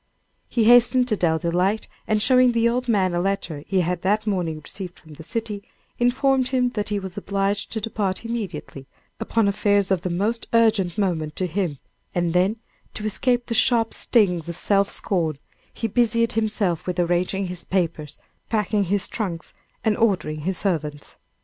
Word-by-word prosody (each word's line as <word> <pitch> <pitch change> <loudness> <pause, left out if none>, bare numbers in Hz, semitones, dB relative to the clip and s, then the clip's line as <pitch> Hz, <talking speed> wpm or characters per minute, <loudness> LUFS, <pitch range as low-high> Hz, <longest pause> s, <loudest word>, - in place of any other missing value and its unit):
He 235 - +1
hastened 245 +2 +6
to 215 - +2
Dell 165 -4 +2
Delight, 180 +5 0 0.2
and 215 -1 +1
showing 255 -1 +5
the 230 0 +3
old 250 +2 -1
man 190 -6 +2
a 175 - +1
letter 180 -6 -2
he 190 -2 +2
had 180 +1 -1
that 210 +3 +1
morning 175 -7 -1
received 180 +3 -8
from 155 -1 -15
the 160 - -11
city, 215 +2 -4 0.4
informed 260 +1 +2
him 255 -1 +1
that 210 -4 -3
he 205 - 0
was 190 0 -5
obliged 200 0 -1
to 220 - -2
depart 205 -1 -2
immediately, 185 - -5 0.3
upon 225 -2 +1
affairs 200 -1 +2
of 190 -3 +2
the 180 - -3
most 210 +7 -1
urgent 220 -6 +3
moment 165 -7 -1
to 185 - -1
him, 175 -4 -2 0.4
and 175 -1 0
then, 185 +4 +3 0.4
to 215 - -4
escape 245 +3 +1
the 230 - -3
sharp 230 0 +3
stings 180 -8 +2
of 170 - -4
self 200 -1 +2
scorn, 165 -6 -1 0.3
he - - -5
busied 230 +1 +2
himself 210 -7 -1
with 180 0 -2
arranging 180 +3 +1
his 180 -1 -5
papers, 165 -6 -2 0.3
packing 210 -2 +1
his 195 +2 0
trunks 180 -7 -4 0.3
and 220 -2 +2
ordering 185 -9 +1
his 185 +5 -2
servants. 150 -6 -3
200 Hz, 175 wpm, -23 LUFS, 175-225 Hz, 0.4 s, hastened